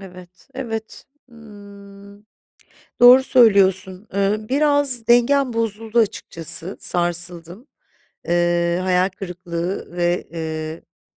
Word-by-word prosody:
Evet, 180 -1 -14
evet. 225 -4 -6 0.3
Hımm. 200 -2 -15 0.7
Doğru 250 +2 +8
söylüyorsun, 195 -5 +3
eee, 200 +1 +1
biraz 285 -4 +1
dengem 245 +2 +3
bozuldu 225 0 -2
açıkçası. 170 -4 -3
Sarsıldım. 175 - -3 0.6
Eee, 175 0 +1
hayal 185 0 +2
kırıklığı 180 -1 -6
ve, 175 0 -1
ııı, 160 0 -7
195 Hz, 85 wpm, -20 LUFS, 175-225 Hz, 0.7 s, Doğru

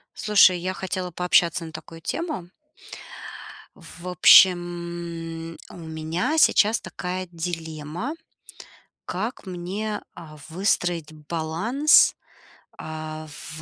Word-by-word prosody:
Слушай, 200 -4 +5
я 185 +2 -2
хотела 185 -1 -4
пообщаться 175 -1 +2
на 160 - -9
такую 160 +1 -10
тему. 310 - -4 1.3
В 180 +1 -11
общем, 170 -2 +3
у - - -11
меня 160 - -2
сейчас 220 -7 +5
такая 185 0 -5
дилемма, 165 - -5 0.9
как 220 +4 -4
мне, 190 +4 -4
а, 155 -2 -11
выстроить 175 -3 0
баланс, 170 - +3 0.6
а, 155 0 -7
в 155 +1 -9
175 Hz, 95 wpm, -24 LUFS, 160-185 Hz, 1.3 s, Слушай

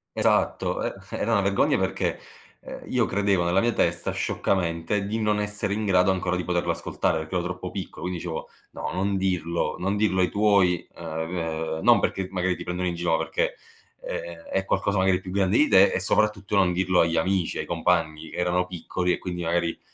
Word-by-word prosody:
Esatto, - - +1
e - - -2 0.2
era - - -1
una - - +4
vergogna - - +2
perché, - - -1 0.4
ehm, - - -9
io 125 -2 +2
credevo 100 -2 +1
nella 90 +3 +2
mia 120 0 +1
testa, - - 0
scioccamente, 90 +1 -1
di 110 +3 -2
non 105 -1 +1
essere 105 -1 -2
in 110 0 -2
grado 95 -1 +4
ancora 90 -1 -1
di 90 - -2
poterlo 90 -1 0
ascoltare, 80 - -1
perché 80 +3 -5
ero 90 - +1
troppo 90 +1 -5
piccolo. 95 -1 -7
Quindi 90 -1 -3
dicevo: 85 -2 -5 0.2
"No, - - -5
non 100 +1 0
dirlo, 90 -3 -1
non 95 +3 -1
dirlo 105 -3 +2
ai 90 - +2
tuoi", 100 -4 +3
ehm, 80 +1 -5
ehm, 80 -1 -3
non - - +6
perché 95 -1 -1
magari 90 -1 0
ti - - -7
prendono 90 +1 -2
in 85 - -2
gi 85 - -6
no, 80 -2 +2
perché, - - -1 0.5
ehm, 85 0 -5 0.2
è 95 0 0
qualcosa 100 +1 0
magari 95 -1 +3
più 95 - -9
grande 95 +2 +2
di 150 - +5
te 95 +1 +6
e - - 0
soprattutto 105 +1 +1
non 95 -3 +4
dirlo 90 0 +2
agli 85 0 +1
amici, 90 +1 0
ai - - -2
compagni, 80 0 0
che - - -9
erano 90 +1 +1
piccoli, 90 0 -2
e - - -3
quindi 90 -1 -4
magari, 85 0 0
90 Hz, 205 wpm, -25 LUFS, 85-100 Hz, 0.5 s, non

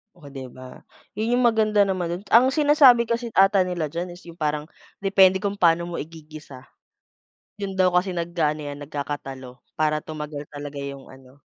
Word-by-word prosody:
Oh, 145 -5 -14
'di 135 -2 -8
ba? 130 +1 -12 0.4
'Yon 230 +3 +1
yung 250 - +1
maganda 215 -3 +3
naman 185 -3 -2
do'n. 175 +4 -5
Ang 240 +3 +7
sinasabi 275 -4 +5
kasi 235 +1 -2
ata 195 -1 +4
nila 165 -5 -3
diyan 175 +2 -5
is 180 - -16
yung 170 0 -13
parang 150 -1 -1 0.4
depende 190 0 +4
kung 200 0 -2
paano 170 -1 +4
mo 170 0 -5
igigisa. 155 -4 -11 1.0
Yun 195 -1 -4
daw 185 -1 +3
kasi 180 +1 0
nag-aano 165 -3 -1
yan, 145 - -9
nagkakatalo. 135 -3 -7 0.2
Para 155 -1 +1
tumagal 150 -1 -7
talaga 145 -1 -8
yung 140 -1 -8
ano 130 +1 -18
170 Hz, 170 wpm, -23 LUFS, 145-195 Hz, 1.0 s, Ang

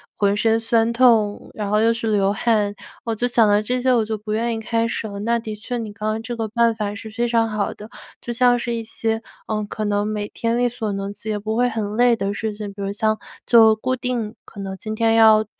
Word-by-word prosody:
浑 200 0 +2
身 225 +1 +3
酸 230 0 +2
痛， 230 -4 +3
然 210 -2 -4
后 210 +1 +3
又 230 - +4
是 230 0 -2
流 200 -1 +3
汗， 210 -1 +1 0.3
我 230 - -2
就 240 +3 0
想 235 -2 +4
到 205 +1 +4
这 250 +3 -1
些， 255 0 +3
我 225 -3 +2
就 220 0 -3
不 210 +1 -7
愿 230 +2 0
意 225 - -5
开 230 +1 0
始 225 - -3
了。 200 0 -7
那 235 +3 +1
的 220 -1 -6
确， 240 +4 -5
你 225 -3 -5
刚 210 +1 -5
刚 220 +1 -2
这 240 +1 -4
个 225 - -2
办 230 +1 +2
法 205 -2 -3
是 220 0 -8
非 235 +2 -1
常 230 -1 +2
好 210 -1 -1
的。 210 +1 -11 0.3
就 240 - -5
像 245 0 +4
是 235 0 -3
一 230 - -3
些， 225 0 -2 0.3
呃， 215 -1 -1
可 215 - -4
能 205 0 0
每 210 -1 -3
天 230 0 -1
力 245 0 +2
所 230 -3 -4
能 195 0 -4
及 215 +2 -7
也 210 - 0
不 220 +2 -3
会 245 +1 +3
很 215 -2 -3
累 245 -1 +5
的 200 -2 -2
事 220 0 -3
情， 210 0 -6
比 200 - -9
如 195 - -2
像 215 +1 0 0.3
就 225 -2 +6
固 255 +4 -1
定 240 -3 -3
可 205 - -12
能 195 -1 -5
今 215 +3 -5
天 225 0 +2
要 220 -1 +6
220 Hz, 275 characters per minute, -21 LUFS, 210-235 Hz, 0.3 s, 就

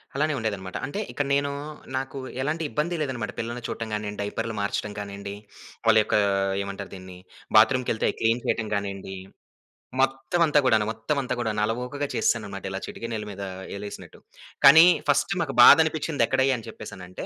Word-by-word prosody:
అలానే 155 +2 +1
ఉండేదనమాట. 100 -5 -3
అంటే 170 +10 -5
ఇక్కడ 145 - -2
నేను 140 0 +1 0.5
నాకు 135 +1 -4 0.2
ఎలాంటి 155 +4 -1
ఇబ్బంది 170 +4 -1
లేదనమాట. 125 -6 -3
పిల్లల్ని 120 +1 -4
చూడటం 110 -1 -5
గానియండి, 105 -1 -4
డైపర్లు 115 +2 -3
మార్చడం 105 +1 -2
గానియండి, 100 0 -6 0.5
వాళ్ళ 110 -1 +6
యొక్కా 105 - +1 0.4
ఏమంటారు 100 0 -6
దీన్ని 95 -1 -11 0.4
బాత్రూమ్‌ 125 +3 +5
కెళ్తే, 110 - 0
అవి - - -3
క్లీన్ 115 +2 +2
చేయటం 110 -2 -1
గానియండి. 100 -1 -4 0.9
మొత్తం 135 +5 0
అంతా 150 -1 +4
గూడాను 110 -4 +4
మొత్తం 115 +7 -2
అంతా 130 - -3
గూడా 110 -2 0
అలవోకగా 125 +6 -3
చేసేసాననమాట. 100 -4 -1
ఇలా 95 - -3
చిటికి 115 - -7
నేలు 105 -1 -3
మీద 100 0 -7 0.3
ఏలేసినట్టు. 100 0 -9 0.5
కానీ 160 +5 +10 0.2
ఫస్ట్ 195 - +2
మాకు - - -2
బాధనిపించింది 155 -3 +5
ఎక్కడయ్యా? 130 0 +2
అని 115 0 -11
చెప్పేసానంటే 90 -4 -9
115 Hz, 155 wpm, -25 LUFS, 100-135 Hz, 0.9 s, కానీ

